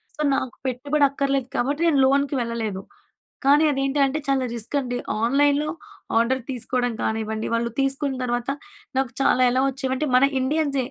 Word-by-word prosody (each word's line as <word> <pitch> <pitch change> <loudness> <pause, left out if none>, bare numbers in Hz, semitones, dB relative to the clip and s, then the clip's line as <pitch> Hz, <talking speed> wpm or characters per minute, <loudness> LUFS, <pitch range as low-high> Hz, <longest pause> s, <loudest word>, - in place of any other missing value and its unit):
So 305 - -5
నాకు 255 -4 -3
పెట్టుబడి 280 +4 +1
అక్కర్లేదు 275 -2 -1
కాబట్టి 285 +6 0
నేను 290 -4 +3
లోన్‍కి 280 +1 +2
వెళ్ళలేదు. 225 -5 -3 0.6
కానీ 290 +3 +6
అదేంటంటే 275 +1 +1
చాలా 270 -1 +2
రిస్క్ 230 +5 -5
అండి. 245 -1 -3 0.3
ఆన్‌లైన్‌లో 285 +4 +2 0.5
ఆర్డర్ 255 +3 +2
తీసుకోవడం 245 -1 -1
కానివ్వండి. 220 0 -2
వాళ్ళు 235 0 -1
తీసుకున్న 270 0 -1
తర్వాత 240 +1 -2 0.5
నాకు 265 -2 0
చాలా 255 - +3
ఎలా 255 +1 +2
వచ్చేవంటే 265 +2 -2
మన 255 - +5 0.2
ఇండియన్సే 280 -1 0
265 Hz, 145 wpm, -23 LUFS, 245-280 Hz, 0.6 s, కానీ